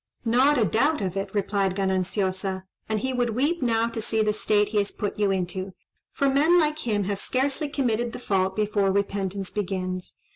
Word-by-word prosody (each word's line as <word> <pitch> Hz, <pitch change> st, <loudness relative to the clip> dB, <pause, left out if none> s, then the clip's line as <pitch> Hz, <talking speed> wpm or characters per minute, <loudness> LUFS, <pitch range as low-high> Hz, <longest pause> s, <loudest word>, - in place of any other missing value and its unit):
"Not 260 Hz, +6 st, +4 dB
a 225 Hz, -, +3 dB
doubt 280 Hz, -, +2 dB
of 185 Hz, -2 st, -2 dB
it," 195 Hz, 0 st, -2 dB
replied 195 Hz, -2 st, 0 dB
Gananciosa; 190 Hz, 0 st, -1 dB, 0.3 s
"and 215 Hz, -1 st, 0 dB
he 260 Hz, +2 st, -1 dB
would 240 Hz, -3 st, 0 dB
weep 295 Hz, +7 st, +1 dB
now 230 Hz, -2 st, +2 dB
to 230 Hz, -1 st, -4 dB
see 220 Hz, 0 st, 0 dB
the 210 Hz, 0 st, +1 dB
state 210 Hz, -1 st, +2 dB
he 210 Hz, -1 st, +1 dB
has 200 Hz, -, -1 dB
put 205 Hz, 0 st, -4 dB
you 205 Hz, -1 st, +3 dB
into: 185 Hz, 0 st, -2 dB, 0.4 s
for 280 Hz, -, 0 dB
men 295 Hz, +6 st, +4 dB
like 305 Hz, -1 st, +1 dB
him 205 Hz, -2 st, +1 dB
have 200 Hz, +1 st, -2 dB
scarcely 275 Hz, +5 st, -1 dB
committed 240 Hz, -5 st, 0 dB
the -, -, -6 dB
fault 190 Hz, -5 st, 0 dB
before 205 Hz, -2 st, +1 dB
repentance 195 Hz, -1 st, -2 dB
begins. 185 Hz, -3 st, -3 dB
210 Hz, 190 wpm, -25 LUFS, 195-245 Hz, 0.4 s, Not